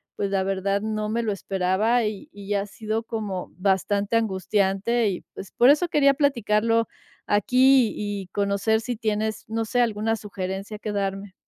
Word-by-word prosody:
pues, 200 -1 -2
la 195 - +1
verdad, 195 +1 -1
no 215 -1 -2
me 230 +2 0
lo 215 - 0
esperaba 195 +5 +1
y 210 -2 -4
y 205 0 -4
ha 200 0 0
sido 220 +2 -4
como 210 -5 -4
bastante 200 +3 +1
angustiante 200 +2 +1
y, 180 - -4
pues, 195 - -9
por 245 - +5
eso 300 +5 +4
quería 280 -2 +4
platicarlo 230 -5 +2 0.4
aquí 255 +3 +4
y 205 -2 -4
conocer 200 +2 +1
si 245 +1 -3
tienes, 215 -1 -2
no 225 0 -2
sé, 245 +2 +1
alguna 225 -1 0
sugerencia 195 0 -5
que 210 0 -5
darme. 195 -1 -3
210 Hz, 160 wpm, -24 LUFS, 195-225 Hz, 0.4 s, por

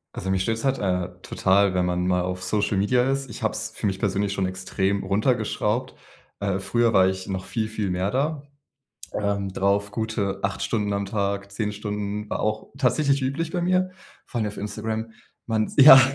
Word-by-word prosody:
Also, 95 +1 -2
mich 95 -1 +1
stört 110 +3 0
es - - -7
halt, 135 -1 +1
äh, 90 -2 0
total, 100 0 +3
wenn 90 -1 +2
man 90 0 0
mal 90 -1 +2
auf 90 +1 -3
Social 100 +2 0
Media 125 +6 +3
ist, 135 -1 -2
ich 115 0 -8
habe 110 - +2
es 110 0 -4
für - - -4
mich 95 -1 0
persönlich 100 0 0
schon 95 -1 0
extrem 95 +1 -1
runtergeschraubt. 110 +2 0 0.5
Äh, 100 -1 0
früher 115 +4 +1
war 95 -1 +6
ich 95 0 -4
noch 95 -1 -3
viel, 110 +1 -2
viel 110 -2 -2
mehr 90 +2 0
da, 145 +3 0 0.7
ähm, 100 -1 -1
drauf. 100 +1 +1
Gute 105 -2 -2
8 100 0 -1
Stunden 105 -3 0
am 100 0 -1
Tag. 100 -1 -2
10 105 +1 -2
Stunden 105 0 -4
war - - -1
auch 110 0 -1
tatsächlich 140 +1 +2
üblich 140 +5 -1
bei 175 - -1
mir, 185 +1 +2 0.3
vor 120 - -5
allem 110 - 0
auf 105 - -8
Instagram. 110 +2 -3 0.4
Man 110 -1 0
ja. 135 -1 +11
105 Hz, 195 wpm, -25 LUFS, 95-115 Hz, 0.7 s, ja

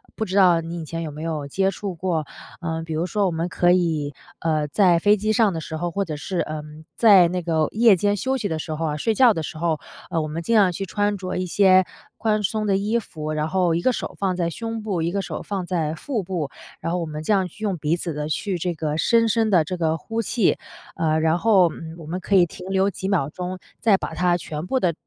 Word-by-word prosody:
不 220 - -2
知 185 - -4
道 180 -4 +6
你 165 +1 -6
以 - - -6
前 165 +2 -4
有 160 - -4
没 150 +2 -8
有 155 -3 -3
接 190 +7 +1
触 195 -2 -5
过。 165 -2 -1 0.4
嗯， 165 -1 -3
比 160 - -5
如 160 +2 0
说 200 +3 0
我 - - 0
们 165 +1 -2
可 175 0 +3
以， 160 -5 +1 0.3
呃， 155 -2 0
在 175 +2 +4
飞 205 +4 +5
机 215 +2 0
上 215 -3 +3
的 165 - -4
时 160 +1 -5
候， 175 +2 -2
或 200 +4 -1
者 155 -3 -4
是， 180 +4 -3
嗯， 155 0 -7
在 200 -6 +7
那 180 +1 -2
个 160 -2 +1
夜 225 -2 +5
间 205 +3 +1
休 260 +5 0
息 220 -5 -2
的 160 -1 -2
时 155 0 -4
候 165 +1 -2
啊， 150 -1 -2
睡 220 +9 +1
觉 250 -2 +6
的 165 - -3
时 155 - -6
候， 160 -1 0 0.3
呃， 165 - +1
我 155 - -3
们 155 +2 -4
尽 230 - 0
量 200 -4 +5
去 195 +3 -4
穿 205 +2 0
着 185 -1 -4
一 185 - -1
些 185 0 +5 0.3
宽 215 -1 0
松 215 +1 -1
的 195 - +3
衣 210 +4 0
服， 155 -8 -6
然 155 0 -1
后 175 0 +1
一 170 - 0
个 255 - +3
手 - - -5
放 190 -2 0
在 170 -2 0
胸 225 +5 -5
部， 195 -6 -1
一 165 +1 0
个 200 - 0
手 - - -5
放 195 -3 -3
在 165 -4 -1
腹 230 - -3
部， 170 -6 -3 0.3
然 165 - -2
后 180 - 0
我 170 - -2
们 155 -1 -6
这 185 - -1
样 190 -2 +2
去 215 +5 -12
用 200 -4 0
鼻 150 +1 0
子 170 -1 -4
的 150 0 -3
去 185 +5 -1
这 175 +1 -2
个 155 -1 -2
深 230 +7 +3
深 225 0 +2
地 180 -6 +4
这 180 +4 -4
个 160 -2 +1
呼 225 +6 -3
气。 225 -2 +1 0.4
呃， 160 -1 +1
然 160 +1 +2
后， 195 -4 +5
嗯， 160 0 -9
我 165 - -10
们 170 +4 -4
可 200 - 0
以 180 -2 +6
停 180 +2 -10
留 190 +1 +2
几 190 -1 -5
秒 175 -9 +1
钟 180 +3 -5 0.2
再 220 -3 +5
把 160 - -5
它 175 +1 +2
全 155 -2 -6
部 260 - +1
地 180 -7 +1
175 Hz, 285 characters per minute, -23 LUFS, 160-200 Hz, 0.4 s, 在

